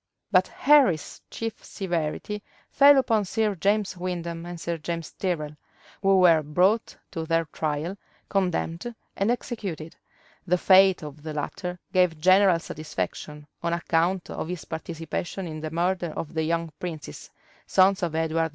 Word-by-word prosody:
But - - +4
Henry's 270 - +3
chief 225 -1 -5
severity 175 +3 -3 0.3
fell 285 0 +7
upon 225 -5 +3
Sir 210 +2 0
James 200 +2 0
Windham 175 -2 -4
and 175 -1 -7
Sir 170 0 -3
James 165 0 -4
Tyrrel, 155 -5 -3 0.5
who 195 -1 +4
were 170 -3 +6
brought 180 +9 +1 0.2
to 165 - -4
their 165 0 +2
trial, 155 +3 -3 0.3
condemned, 185 +3 -1 0.2
and 200 +3 0
executed: 200 -10 -4 0.5
the 180 +1 +3
fate 190 -1 +5
of 150 0 -9
the 155 0 -6
latter 180 +4 -4 0.2
gave 180 -4 +3
general 185 +1 +5
satisfaction, 155 -2 -5 0.2
on 170 0 -1
account 170 +2 0
of - - -4
his 180 -2 -5
participation 165 +3 -5
in 155 -2 -6
the 155 0 -4
murder 175 +1 -1
of 160 - -5
the 160 - 0
young 165 0 -1
princes, 160 - -7 0.4
sons 190 +1 +4
of 170 -3 -1
Edward 160 0 +1
IV. - - -3
170 Hz, 150 wpm, -26 LUFS, 160-190 Hz, 0.5 s, fell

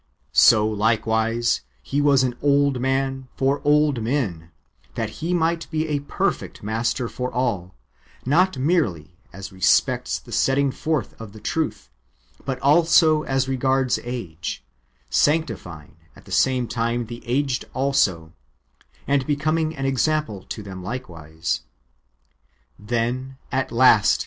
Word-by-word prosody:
So 110 -3 +6
likewise 110 +2 +1 0.2
He 140 +1 -1
was 140 -2 +4
an 125 -1 0
old 140 -2 +2
man 135 0 -1
for 135 +1 +1
old 145 -3 +3
men, 110 - -2 0.5
that - - -4
He 170 - -1
might 165 -1 0
be 160 0 -1
a 145 -1 0
perfect 140 -6 -3
Master 115 +4 -1
for 125 +2 -4
all, 100 - -2 0.5
not 170 +5 +3
merely 105 - -1
as 95 +2 -9
respects 95 -2 +2
the - - -14
setting 135 +1 +2
forth 150 -5 -2
of 105 -3 -9
the 110 - -11
truth, 150 - -3 0.5
but 135 -2 -3
also 155 +1 +5
as 135 -1 0
regards 130 0 +1
age, 115 -10 -5 0.5
sanctifying 115 - -1 0.2
at - - -17
the - - -14
same 130 -2 +2
time 115 +1 -1
the 120 +1 -9
aged 130 +1 0
also, 105 -12 0 0.7
and 140 -2 +1
becoming 155 +2 0
an 135 - -3
example 135 -5 0
to 110 - -7
them 95 -2 -8
likewise. 85 -8 -4 1.2
Then, 120 +5 -2
at 130 0 -1
last. 115 -3 +5
130 Hz, 130 wpm, -23 LUFS, 110-140 Hz, 1.2 s, So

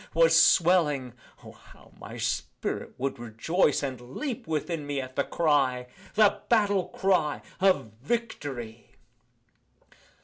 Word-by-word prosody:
was 165 0 +5
swelling 160 -7 +4 0.3
(O! - - -11
how - - -19
my - - -9
spirit - - -3
would 135 -1 -3
rejoice, 130 - 0
And 130 -3 -4 0.2
leap 270 - -4
within 155 -1 -3
me 145 -1 -2
at 130 -1 -7
the - - +1
cry) 135 -6 +1 0.3
The 210 -2 +4
battle 205 -5 +2
cry 180 -6 0 0.2
of 185 - +2
Victory! 135 - -5
150 Hz, 115 wpm, -27 LUFS, 130-185 Hz, 0.3 s, was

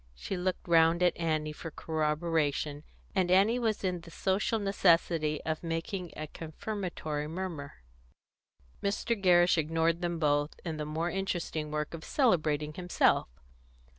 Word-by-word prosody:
She 65 - -4
looked 185 0 -2
round 165 +1 +5
at 175 -2 +4
Annie 155 -2 -1
for 165 - -7
corroboration, 155 -2 -1 0.3
and 185 -3 +1
Annie 200 +6 +4
was 220 -4 0
in 180 -2 -1
the 165 - -12
social 190 +6 0
necessity 170 -6 +2
of 160 -1 -2
making 170 +2 -3
a 155 - -3
confirmatory 160 -2 -4
murmur. 160 - -6 1.0
Mr. 205 +3 0
Gerrish 175 -4 +4
ignored 165 +2 +1
them 175 -1 -1
both 145 -1 +1
in 160 -2 -3
the 150 - -3
more 160 +3 -2
interesting 175 -5 -2
work 150 +1 -3
of 165 -1 -7
celebrating 155 - +1
himself. 180 +2 +2
165 Hz, 135 wpm, -30 LUFS, 155-185 Hz, 1.0 s, round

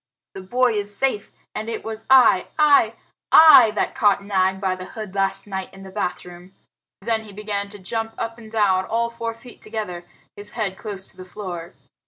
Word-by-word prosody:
"The 190 - -8
boy 245 +5 +1
is 205 -1 -3
safe, 260 -7 0 0.2
and 220 +1 -5
it 230 - -5
was 220 0 -7
I 250 -8 +6
I 285 -7 +4 0.4
I 310 -8 +9
that - - -1
caught 205 -2 +2
Nag 190 -1 +1
by 190 -1 0
the 185 0 -8
hood 215 -4 -6
last 195 -1 0
night 190 -2 -5
in 195 - -12
the 190 - -11
bathroom." 180 0 -6 0.5
Then 220 +1 -1
he 210 - -12
began 200 0 -4
to 205 - -11
jump 225 +4 -4
up 230 +1 -5
and 220 -1 -13
down, 195 -4 +2
all 235 +1 -1
four 230 -1 -5
feet 245 +1 -15
together, 210 -6 -5 0.3
his 205 +1 -6
head 200 -4 -2
close 195 -2 -7
to - - -19
the 185 - -9
floor. 180 -2 -8
210 Hz, 195 wpm, -22 LUFS, 190-225 Hz, 0.5 s, I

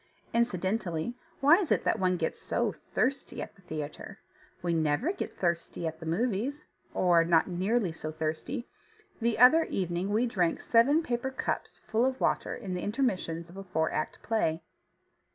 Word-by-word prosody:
Incidentally, 195 -4 0 0.3
why 295 +5 +7
is 365 -7 -2
it - - +3
that - - +1
one 185 -1 +2
gets 160 - -2
so - - 0 0.2
thirsty 275 +2 0
at - - -5
the 195 - -21
theatre? 155 -4 -6 0.5
We 175 -1 +1
never 160 - +1
get 390 - -5
thirsty 170 -1 -1
at 160 0 -3
the 165 - -7
movies, 235 - -1 0.3
or 175 -2 +5
not 165 -1 +3
nearly 190 +2 0
so 155 -1 -6
thirsty. 160 - -3 0.5
The 230 -1 +1
other 255 +8 +7
evening 180 0 -2
we 220 +4 +2
drank 185 -8 0
seven 275 +8 +4
paper 245 -1 -1
cups 265 - -3
full 220 +2 +1
of 260 0 -2
water - - 0
in 195 -6 -5
the 180 - -2
intermissions 190 -8 -1
of 175 +3 -13
a 195 - -6
four 160 -4 0
act 155 - -3
play. 170 -8 0
190 Hz, 170 wpm, -30 LUFS, 170-240 Hz, 0.5 s, why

